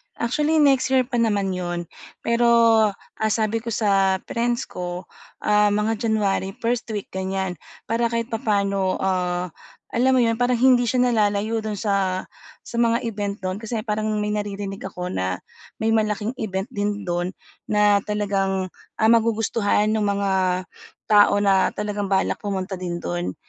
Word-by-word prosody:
Actually, 300 +6 +1
next 270 -2 +4
year 260 -1 +3
pa 245 -1 -2
naman 205 -4 +1
'yon, 175 -1 -3 0.4
pero, 235 +1 +2 0.7
ah, 215 -1 +1
sabi 220 +1 0
ko 230 - -14
sa 195 -4 +2
friends 235 0 -1
ko, 180 0 -6 0.4
ah, 210 0 +4
mga 210 +2 0
January 200 -2 0
first 240 +1 0
week 205 - -5
ganyan, 190 -2 -3 0.2
para 230 +1 0
kahit 230 +1 -3
papaano, 200 -4 0
ah, 180 -1 -1 0.4
alam 260 +2 +3
mo 250 - +4
'yon 230 0 +1
parang 245 0 +2
hindi 250 -2 +5
siya 250 +1 +2
nalalayo 215 0 +1
do'n 215 -1 -4
sa, 195 -2 0 0.4
sa - - -9
mga 235 0 +2
event 205 -3 -3
do'n. 185 +2 -2
Kasi 225 -1 -4
parang 215 -1 -1 0.2
may 210 - -1
naririnig 200 -1 -4
ako 180 -1 -5
na 95 -1 -2 0.4
may 225 - +2
malaking 215 0 0
event 195 +3 -3
din 205 -1 -2
do'n 175 0 -2 0.3
na 210 -1 +4
talagang, 195 -3 -1 0.2
ah, 220 0 +3
magugustuhan 225 -2 +2
nung 215 -1 +1
mga 190 -2 +1 0.5
tao 205 -1 +6
na 195 -1 +3
talagang 205 -1 -2
balak 190 0 +1
pumunta 190 -2 -3
din 175 -1 -4
do'n. 85 +1 -3
205 Hz, 155 wpm, -23 LUFS, 190-230 Hz, 0.7 s, tao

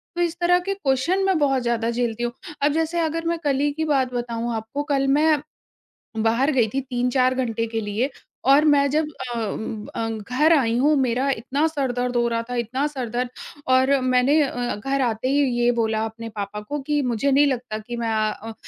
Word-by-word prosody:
तो 350 - -1
इस 340 -1 0
तरह 355 +1 +4
के 395 +2 -2
क्वेश्चन 340 +3 0
मैं 380 -3 +2
बहुत 270 -3 +2
ज़्यादा 235 -1 0
झेलती 235 -1 -2
हूँ। 240 - -1 0.3
अब 290 +1 +3
जैसे 325 +1 0
अगर 330 0 -1
मैं 335 0 0
कल 275 -2 +1
ही 290 0 +1
की 315 +1 -2
बात 265 -4 +1
बताऊँ 235 -1 -3
आपको 225 +7 -4
कल 275 0 +1
मैं 310 -1 +3 0.8
बाहर 245 +6 +2
गई 240 -5 +3
थी 270 - 0
3-4 255 0 +1
घंटे 230 -3 -1
के 225 0 -3
लिए 215 +6 -1 0.4
और 295 +3 +6
मैं 285 -1 +4
जब 305 +2 +1 0.3
अ - - -4
उम 220 -1 -3
उम 210 -1 -8
अ, 225 - -1
घर 250 +9 +1
आई 235 -6 +2
हूँ 295 +4 +3
मेरा 255 +2 +1
इतना 265 +6 -1
सर 280 -5 -1
दर्द 245 0 -2
हो 240 0 +2
रहा 230 0 -1
था, 245 - -3
इतना 245 +4 -1
सर 260 -6 -5
दर्द 245 +1 -2 0.4
और 260 +2 +4
मैंने 255 +4 +3
अ, 245 -3 -2
घर 270 +6 -1
आते 235 0 -1
ही 285 +1 +2 0.2
ये 240 0 +4
बोला 220 -2 0
अपने 225 +1 -7
पापा 210 -1 -5
को 290 +7 -4
कि 295 -1 +1
मुझे 250 +2 0
नहीं 285 +2 +5
लगता 250 -5 -2
कि 240 +3 -7
मैं 230 -1 -2
अ, 215 +1 -2
255 Hz, 215 wpm, -23 LUFS, 230-290 Hz, 0.8 s, और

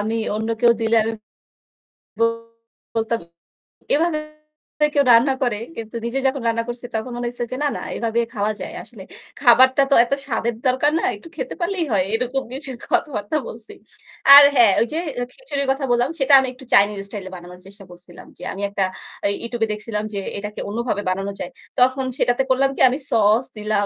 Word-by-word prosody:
আমি 220 +2 -1 0.2
অন্য 220 +1 -3
কেউ 240 -1 +6
দিলে 225 0 +2
আমি 225 +1 -2 1.8
বলতাম 225 +1 0 0.7
এভাবে 310 +1 +1 0.8
কেউ 285 -1 +4
রান্না 245 +4 +5
করে? 240 -5 0 0.2
কিন্তু 225 0 -7
নিজে 240 +3 -2
যখন 265 0 -1
রান্না 230 0 0
করছি 240 0 -6
তখন 220 +3 -3
মনে 240 0 -3
হয়েছে 240 0 -4
যে 255 - -3
না, - - +2
না - - -7 0.2
এভাবে 230 0 -1
খাওয়া 210 -1 0
যায়। - - -6
আসলে - - -13 0.4
খাবারটা 260 +1 +6
তো - - +6
এত 240 - -8
স্বাদের 235 -2 -2
দরকার 260 +4 +2
না, - - -4
একটু - - -13
খেতে - - -5
পারলেই 345 -1 -1
হয়। 195 -3 +2
এরকম 250 +3 -1
কিছু 270 0 -6 0.2
কথাবার্তা 295 - 0
বলছি। 225 0 -10 0.6
আর 285 - +12
হ্যাঁ, 235 -5 +6
ওই 230 - +2
যে 320 - -1 0.2
অ্যা 245 - -1
খিচুড়ির 285 - -4
কথা 270 +1 -2
বললাম 245 +2 +2
সেটা 275 +1 +3
আমি 265 - -1
একটু 260 +1 -15
চাইনিজ 205 +1 +4
স্টাইলে 200 -2 -7
বানানোর 180 0 -11
চেষ্টা 200 +1 -13
করছিলাম। 175 0 -14
যে - - -12
আমি 195 - -7
একটা 200 -1 -1 0.4
আ - - +4 0.2
YouTube 235 -1 -3
এ - - -8
দেখছিলাম 210 0 -4
যে 200 - -2 0.2
এটাকে 210 +1 -6
অন্যভাবে 225 -1 -2
বানানো 195 +2 -2
যায়। - - -5 0.3
তখন 260 +1 +3
সেটাতে 245 +2 +1
করলাম 265 +1 +3
কি - - -4
আমি 255 - -2
sauce 225 +2 +3
দিলাম, 210 -1 0
235 Hz, 185 wpm, -21 LUFS, 210-265 Hz, 1.8 s, আর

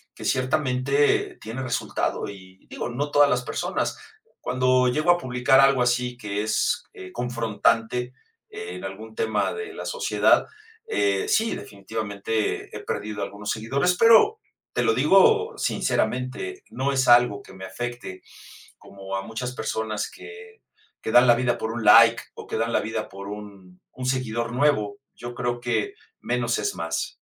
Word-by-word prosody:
que - - -9
ciertamente 135 +1 +1
tiene 115 +5 -5
resultado 125 -4 -2
y 95 -1 -14
digo: - - -5
"No 145 +5 -3
todas 145 -1 +5
las 125 - +1
personas". - - -2 0.4
Cuando 130 0 +2
llego 155 +7 0
a 175 - +4
publicar 130 -2 +3
algo 135 -2 +4
así 125 0 0
que 105 -2 -3
es, 110 - 0
eh, 95 0 -10
confrontante, 120 +1 0 0.4
eh, 430 +1 -7
en - - -8
algún 110 +3 -8
tema 110 -1 0
de 435 -2 -6
la - - -7
sociedad, 485 -1 +2 0.4
eh, 415 -1 0
sí, 225 - +2
definitivamente 105 +1 -4
he - - -6
perdido 105 -1 -4
algunos 100 +1 -5
seguidores, 140 +11 0
pero 230 - +6 0.3
te - - 0
lo 435 - +3
digo 450 0 +4
sinceramente, 130 - -2
no 135 +2 -1
es 130 -2 +1
algo 120 -4 +5
que - - -15
me 95 0 -11
afecte 120 -1 -6 0.6
como 95 0 -9
a 95 - -3
muchas 125 +3 -5
personas 110 -2 -3
que 440 +1 -12 0.4
que 110 - -3
dan 125 +1 +7
la 120 - +7
vida 120 -1 +1
por 110 - -3
un 115 -1 -4
like 115 +2 +7
o - - -10
que - - -3
dan 115 +1 -1
la - - +2
vida 110 0 -4
por 100 +1 -9
un 100 -3 -10
un 130 - -6
seguidor 120 -2 -1
nuevo, 130 -4 +1 0.2
yo 120 +1 -8
creo 120 0 -2
que 125 - -1 0.3
menos 120 -1 -1
es 105 - -1
más. 80 0 -4
120 Hz, 160 wpm, -24 LUFS, 110-135 Hz, 0.6 s, dan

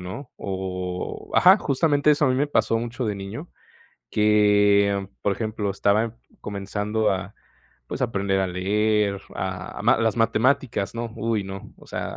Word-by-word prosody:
¿no?, 95 +9 -8
o 90 -1 -4 0.4
Ajá, 185 +3 +7
justamente 145 -1 +2
eso 145 0 +3
a - - +3
mí 130 - +2
me 140 +3 +1
pasó 115 -4 +2
mucho 120 +2 -4
de 105 -2 -1
niño, 100 - -7 0.6
que, 105 -2 +3 0.2
por 100 - +1
ejemplo, 110 -1 -3
estaba 105 +4 +1 0.2
comenzando 105 +2 -2
a 95 +2 -5 0.5
pues - - -5
a 125 - +3
aprender 100 -3 0
a 95 - +1
leer, 100 +2 +1
a 95 -1 -5
ma - - +4
las 110 -1 +1
matemáticas, 115 -1 +1
¿no?, 115 -1 -4
uy, 110 -2 -1
no, 95 0 -8
o - - -17
sea, - - -5
105 Hz, 160 wpm, -24 LUFS, 100-115 Hz, 0.6 s, Ajá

